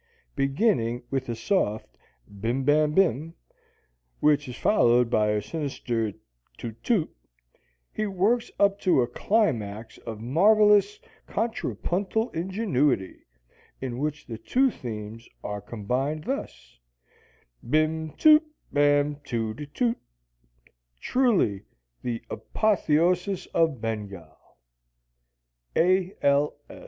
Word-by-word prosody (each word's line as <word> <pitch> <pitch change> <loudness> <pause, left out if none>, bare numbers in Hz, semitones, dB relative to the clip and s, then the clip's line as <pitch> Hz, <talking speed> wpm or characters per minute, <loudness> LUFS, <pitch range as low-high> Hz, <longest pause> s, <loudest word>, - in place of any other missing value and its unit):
Beginning 135 - +1
with 135 -2 -2
a 120 - -2
soft 115 - -1 0.4
bim 120 +6 -1
bam 150 +2 +3
bim, 165 - +2 0.8
which 145 -2 +2
is 125 - -7
followed 120 - +3
by 105 -3 +3
a 105 -1 0
sinister 120 -5 -3 0.4
toot, 115 -1 -8
toot, 205 -10 0 0.8
he 215 - -1
works 205 +5 +1
up 200 0 +3
to 175 -11 +3
a - - -2
climax 115 - -1
of 110 -2 -7
marvelous 210 - +4 0.3
contrapuntal 220 -1 -2
ingenuity, 165 - 0 0.6
in 125 -2 -4
which 150 +1 -3
the 115 -2 -7
two 260 - +2
themes 110 - -8
are 105 0 -4
combined 125 +9 -3
thus: 60 - -6 0.9
Bim, 155 +2 +1
toot, 310 0 +6 0.3
bam, 145 0 +3
toot 115 -3 -3
a 145 - -6
toot, 235 - -1 1.0
Truly 210 - +1 0.4
the 120 -2 -4
apotheosis 180 -1 +1
of 160 -6 +2
Bengal! 100 -8 -5 1.4
A. 185 +2 +2
L. 140 +1 +2
145 Hz, 105 wpm, -26 LUFS, 115-190 Hz, 1.4 s, toot